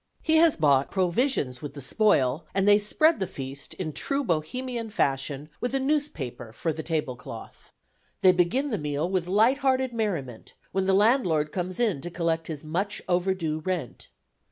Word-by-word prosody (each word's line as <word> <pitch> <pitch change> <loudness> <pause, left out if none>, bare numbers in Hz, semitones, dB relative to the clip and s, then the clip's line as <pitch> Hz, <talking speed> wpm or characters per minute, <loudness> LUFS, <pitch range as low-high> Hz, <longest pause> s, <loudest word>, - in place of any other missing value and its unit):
He 320 -1 +3
has 325 -1 +5
bought 140 -3 +3
provisions 180 - 0
with 145 -1 -7
the - - -7
spoil, 145 - +2
and 195 +1 +2
they 205 0 +7
spread 310 +10 +3
the 190 - -1
feast, 135 0 -7
in 160 -5 -4
true 275 - -1
Bohemian 230 - -2
fashion, 140 -5 -1
with 245 +2 -2
a - - +2
newspaper 265 - -2
for 155 +8 -2
table 155 -4 -2
cloth. 115 -2 -11 0.5
They 185 - +8
begin 210 +11 +1
the 215 - -1
meal 150 +2 -1
with 185 -2 -1
light 220 +8 +3
hearted 260 -2 +1
merriment, 170 - -3 0.2
when 190 0 0
the 195 - +3
landlord 190 - +3
comes 185 +4 -3
in 210 - +1
to 175 - -5
collect 165 -1 -1
his 155 -2 -6
much 195 +7 -2
overdue 175 -3 0
rent. 170 -7 -4
180 Hz, 170 wpm, -26 LUFS, 150-225 Hz, 0.5 s, They